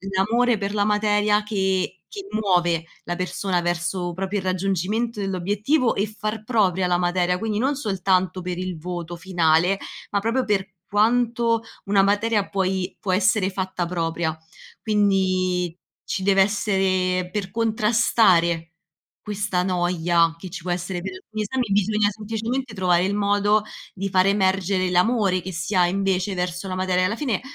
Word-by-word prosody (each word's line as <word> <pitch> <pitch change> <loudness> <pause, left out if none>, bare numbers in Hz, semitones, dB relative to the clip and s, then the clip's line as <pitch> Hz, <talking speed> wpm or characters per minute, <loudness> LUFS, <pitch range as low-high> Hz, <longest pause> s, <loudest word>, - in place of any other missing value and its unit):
l'amore 230 +4 +2
per 200 0 -3
la 205 -1 +1
materia 210 0 +2
che 190 -3 -1 0.2
che 395 -2 -7
muove 175 - +1 0.2
la 175 - -2
persona 185 0 -1
verso 175 +1 -2
proprio 195 +3 -3
il 190 - -4
raggiungimento 195 +5 -1
dell'obiettivo 205 - 0
e 200 - +1
far 215 0 -5
propria 195 -6 +1
la 175 -1 +2
materia, 180 0 +1
quindi 215 -1 -2
non 270 +5 +1
soltanto 185 - 0
per 180 0 -4
il 185 -2 -4
voto 175 +1 -5
finale, 175 +1 +2 0.3
ma 200 - +1
proprio 230 +5 0
per 195 -2 -1
quanto 230 +1 +2 0.2
una 200 -1 +3
materia 205 +1 +1
puoi 190 -1 -1
può 190 - -2
essere 190 0 +2
fatta 185 -2 -3
propria. 165 -2 -2 0.5
Quindi 185 -4 +1 0.3
ci 190 - -3
dev'essere, 190 -2 +1
per 200 -3 -3
contrastare 215 -7 +2 0.5
questa 205 -3 -2
noia 175 -2 +1
che 185 +1 -9
ci 180 - -6
può 180 - -6
essere 180 0 -3
per 190 +1 -5
alcuni 215 +3 -7
esami, 235 0 -2
bisogna 205 +1 +2
semplicemente 225 +3 -4
trovare 180 -2 +2
il 200 +1 -1
modo 205 +1 +2 0.3
di 195 +1 -3
fare 185 +1 +3
emergere 190 -1 +1
l'amore 185 0 +2
che 190 - -6
si 170 +4 -4
ha 180 -1 +4
invece 190 0 0
verso 180 +1 -3
la 185 - -3
materia. 185 0 +1
Alla 205 +4 0
fine 235 -6 -1
190 Hz, 150 wpm, -23 LUFS, 180-210 Hz, 0.5 s, ha